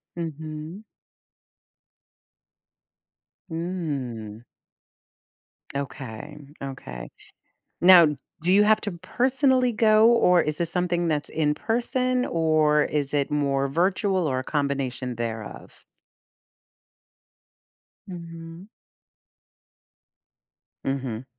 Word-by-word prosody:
Mhm. 160 +3 -6 2.7
Mm. 140 - -4 1.3
Okay, 140 0 -6 0.2
okay. 125 - -7 0.7
Now, 175 -2 +8 0.4
do 180 +2 +2
you 205 +1 +6
have 215 +1 +4
to 205 - -3
personally 255 - +1
go? 215 0 +5
Or 180 -7 +5
is 150 0 -3
this 170 -1 -2
something 175 -1 0
that's 150 -2 -1
in-person? 240 - 0
Or 155 -2 +3
is 145 -1 -2
it 140 -1 +1
more 140 -2 0
virtual? 185 +3 +1
Or 130 -2 0
a - - -7
combination 135 -4 -2
thereof? 115 -2 -7 2.2
Mhm. 170 0 -9 2.2
Mhm. 130 -4 -3
160 Hz, 80 wpm, -25 LUFS, 140-185 Hz, 2.7 s, Now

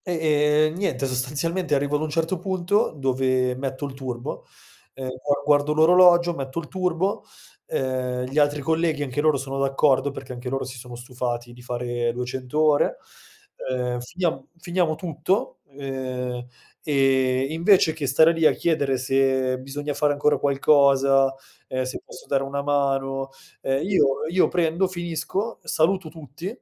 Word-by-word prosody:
E, 180 - -2
ehm, 155 -1 +2
niente, 140 -9 -1
sostanzialmente 145 +6 -1
arrivo 140 +1 0
ad 145 - 0
un 155 - -2
certo 165 +3 -1
punto, 185 +1 0
dove 130 -1 +1
metto 135 +2 -4
il 140 - -6
turbo, 130 -3 -6 0.5
e 135 - -9 0.2
gua 145 -1 +1
guardo 145 0 +3
l'orologio, 175 +2 +6
metto 135 -1 -6
il 160 - -7
turbo, 185 +1 -1 0.4
ehm, 130 -1 -2
gli 135 +4 -1
altri 145 0 +2
colleghi 160 0 0
anche 145 +1 -2
loro 155 -2 +3
sono 135 0 -4
d'accordo, 135 0 +2
perché 135 -2 -8
anche 125 +1 -6
loro 135 +1 -2
si 130 -1 -8
sono 125 0 -9
stufati 120 -1 -5
di 120 - -14
fare 120 -1 -2
200 125 +3 -4
ore, 155 - +3 0.7
ehm, 125 -1 -1
finiam 160 +2 -3
finiamo 175 -2 0
tutto, 175 +4 -2 0.2
ehm, 130 -2 -4 0.4
e 135 -2 +2
invece 165 0 +4
che 155 -3 -4
stare 160 +5 +5
lì, 165 -1 +4
a - - +3
chiedere 145 -5 0
se 130 0 +1
bisogna 145 +3 -5
fare 150 0 +1
ancora 145 +1 +1
qualcosa, 140 -1 +4 0.4
ehm, 130 0 -2
se 130 +1 -5
posso - - -13
dare 135 -1 0
una 140 +1 -3
mano, 135 -1 0 0.3
ehm, 135 +1 0
io 185 -8 +4 0.2
io 185 +1 +4
prendo, 175 +1 +1
finisco, 175 +4 -4
saluto 170 +1 0
tutti, 155 +1 -9
140 Hz, 155 wpm, -24 LUFS, 130-160 Hz, 0.7 s, l'orologio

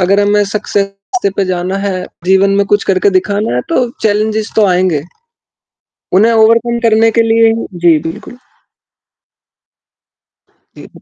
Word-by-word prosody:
अगर 195 +2 +2
हमें 205 0 +2
सक्सेस 200 - -3
पे 200 - +1
जाना 185 +1 -3
है, 190 -2 -3 0.2
जीवन 190 +2 +3
में 200 - +2
कुछ 205 0 +1
करके 195 +1 +1
दिखाना 200 - -1
है 125 - 0
तो 250 -1 +1
चैलेंजेस 215 0 -1
तो 215 - +4
आएँगे। 180 -5 0 1.1
उन्हें 215 +5 +4
ओवरकम 230 +1 +2
करने 225 +1 +3
के 230 - +2
लिए 225 0 +3 0.2
जी, 170 -2 +2
बिल्कुल। 210 +10 -8 2.4
जी। - - -12
205 Hz, 130 wpm, -12 LUFS, 185-220 Hz, 2.4 s, तो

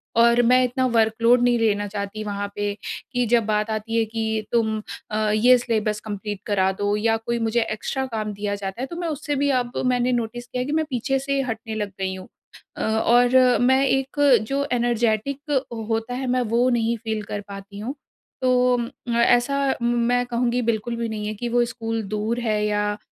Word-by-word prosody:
और 235 +1 +5
मैं 255 +2 +5
इतना 255 +1 0
वर्क 225 -3 +2
लोड 240 +1 +5
नहीं 245 -1 +3
लेना 205 -2 +1
चाहती 200 +1 -5
वहाँ 205 -1 -3
पे, 205 0 -1 0.4
कि 245 0 +1
जब 230 -1 +3
बात 215 0 0
आती 220 +1 -2
है 225 - +4
कि, 220 -1 -2
"तुम 220 -2 +1 0.3
अ, 215 0 0
ये 250 +4 +6
सिलेबस 215 -3 -1
कम्पलीट 205 -1 -5
करा 190 -2 +2
दो।" 205 0 +1
या 225 +1 +2
कोई 235 +1 -3
मुझे 225 +1 +1
एक्स्ट्रा 265 +5 -2
काम 215 -1 -2
दिया 205 0 -3
जाता 200 +4 -5
है, - - -1
तो 340 - -8
मैं 345 0 -3
उससे 295 -1 -3
भी 285 +1 +1
अब, 245 0 -7
मैंने 250 0 +2
नोटिस 240 0 -3
किया 250 - -4
है - - -2
कि 290 - -4
मैं - - -2
पीछे 270 +1 0
से 275 +1 -1
हटने 225 -3 -4
लग 210 -2 -3
गई 190 0 -1
हूँ। 185 0 -10 0.5
अ, - - -4
और 240 +3 +3 0.3
मैं 260 +2 +4
एक 270 +2 -1 0.3
जो 280 +1 0
एनर्जेटिक 240 +4 0 0.4
होता 225 +2 -1
है, 260 +1 -3
मैं 250 0 +1
वो 240 +2 +2
नहीं 235 -1 +1
फ़ील 220 -1 -3
कर 205 0 -5
पाती 200 0 -9
हूँ। 250 +7 -4 0.5
तो 250 -1 +3
उम, 235 -1 -2 0.3
ऐसा 265 +3 +3
म 240 0 +1 0.2
मैं 245 0 +2
कहूँगी, 245 0 0
बिल्कुल 230 0 -1
भी 230 0 -3
नहीं 210 -1 -4
है 215 - -2
कि 240 +3 -4
वो 240 0 +3
स्कूल 225 -1 -3
दूर 220 +3 -1
है 215 -3 0
या 205 0 0
230 Hz, 205 wpm, -23 LUFS, 215-245 Hz, 0.5 s, ये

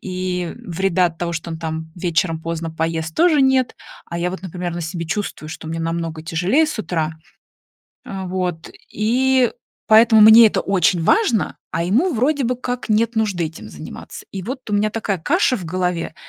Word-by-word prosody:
И 180 -2 -3
вреда 185 0 +1
от 165 -1 -6
того, 170 -1 -2
что 165 +1 -5
он 160 - -5
там 160 0 -5
вечером 165 -2 -1
поздно 165 0 -4
поест, 160 0 -3
тоже 330 -4 +4
нет. 265 -1 +2 0.3
А 170 - -5
я 175 +1 -1
вот, 185 -1 -7
например, 180 -1 -5
на 175 - -4
себе 170 0 -4
чувствую, 160 -4 -4
что 160 -1 -8
мне 165 0 -3
намного 165 -1 -3
тяжелее 180 - +2
с 300 - -5
утра. 160 -6 -2 0.9
А, 190 -1 -6
вот, 180 -3 -3 0.2
и 250 +3 +2 0.3
поэтому 220 0 +6
мне 220 +2 +9
это - - -1
очень 185 -2 +2
важно, 320 - +2
а 170 +1 -1
ему 265 - +2
вроде 275 +4 +1
бы 245 +1 0
как 245 -1 -4
нет 225 +2 +2
нужды 205 -6 0
этим 160 0 -8
заниматься. 155 - -10
И 190 -1 -5
вот 255 +3 -6
у - - -3
меня 210 +1 +2
такая 205 -4 -2
каша 290 - +2
в 185 - -7
голове. 180 -1 -2
185 Hz, 185 wpm, -20 LUFS, 165-225 Hz, 0.9 s, мне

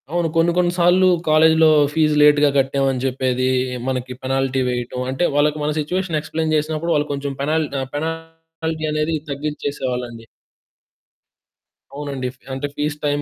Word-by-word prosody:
అవును. 170 +1 0
కొన్ని 165 +1 +3
కొన్ని 175 -1 +3
సార్లు 180 +2 +4 0.2
కాలేజి‌లో 160 +1 +5 0.3
ఫీస్ 155 -1 +2
లేట్‌‌గా 150 0 +6
కట్టామని 135 -1 +1
జెప్పేది. 130 -1 -1 0.4
మనకి 130 -1 -3
పెనాల్టీ 135 0 0
వేయటం 125 +1 -3
అంటే 135 +6 -1
వాళ్ళకి 150 +1 +2
మన 150 - 0
సిట్యుయేషన్ 175 +2 -1
ఎక్స్‌ప్లేయిన్ 155 +1 -2
జేసినప్పుడు, 155 +2 -1
వాళ్ళు 150 0 0
కొంచెం 140 0 -4
పెనాల్ 155 +2 +1 0.3
పెనాల్టీ 165 0 -5
అనేది 155 +1 0 0.2
తగ్గించేసేవాళ్ళండి. 130 -5 -4 1.7
అవునండి. 140 -3 -4
ఫ్ - - -31 0.2
అంటే 135 +2 -3
ఫీస్ 150 0 -2
టైమ్ 145 0 0
150 Hz, 130 wpm, -20 LUFS, 135-160 Hz, 1.7 s, లేట్‌‌గా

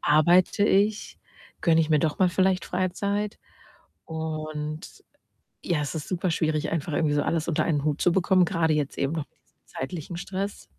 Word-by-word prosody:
Arbeite 175 +6 +4
ich? 205 +1 +1 0.4
Gönne 165 -2 +4
ich 160 0 0
mir 150 - +5
doch 155 0 0
mal 185 -1 +4
vielleicht 185 +1 +1
Freizeit?” 200 +3 -2 0.7
Und, 155 0 -5 0.6
ja, 165 -4 0
es 145 - -3
ist 155 - -5
superschwierig, 165 -4 0
einfach 160 -1 -2
irgendwie 150 -1 +1
so 145 - +2
alles 160 -1 -1
unter 165 - +1
einen 150 -4 0
Hut 150 0 -1
zu 175 - +4
bekommen, 185 0 +3
grade 160 -1 +1
jetzt 150 -2 -2
eben 140 +2 0
noch 155 -3 -3
mit - - -41
diesem - - -41
zeitlichen 170 +4 -6
Stress. 195 +3 -4
165 Hz, 170 wpm, -26 LUFS, 155-185 Hz, 0.7 s, mir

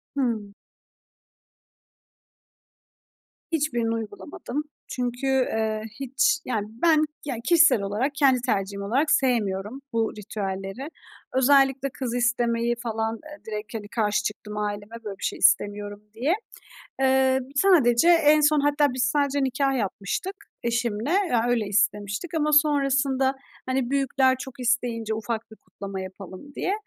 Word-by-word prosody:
Hıı. 225 -7 -1 3.0
Hiçbirini 240 -8 0
uygulamadım. 230 +6 -5 0.2
Çünkü, 250 +1 -3
eee, 220 -5 0 0.2
hiç, 270 +1 +1
yani, 215 -4 -2
ben, 310 +6 +3 0.2
yani, 255 -5 -4
kişisel 335 - +5
olarak 210 +8 -1
kendi 270 -4 +4
tercihim 200 -5 -1
olarak 265 +10 +1
sevmiyorum 220 -1 0
bu 225 -1 0
ritüelleri. 195 +4 -5 0.4
Özellikle 270 +1 +4
kız 255 -2 -4
istemeyi 240 -1 +1
falan, 225 -1 -2
eee, 305 -1 -12
direkt, 210 0 -6
hani, 215 -2 -5
karşı 210 -1 0
çıktım 210 0 -5
aileme 205 +1 -4
"Böyle 200 -3 -6
bir - - -11
şey - - -2
istemiyorum." 205 0 +2
diye. 255 +9 +1 0.7
Emm, 265 -1 +3
sadece 295 -6 +5
en 305 -3 +6
son 300 0 +4
hatta 290 -1 +2
biz 255 0 +1
sadece 280 +2 +1
nikâh 270 0 0
yapmıştık 205 - -3 0.3
eşimle, 235 +1 -1 0.2
yani, 240 0 +2
öyle 230 -3 +1
istemiştik 205 - -1
ama 300 -1 +1
sonrasında, 275 -3 +3 0.3
hani, 260 -1 -1
büyükler 270 -1 +2
çok 265 0 -8
isteyince 235 -3 0
"Ufak 220 0 -4
bir 220 - -13
kutlama 195 -2 -8
yapalım." 190 +7 -10
diye. 375 - -1
245 Hz, 125 wpm, -25 LUFS, 215-275 Hz, 3.0 s, en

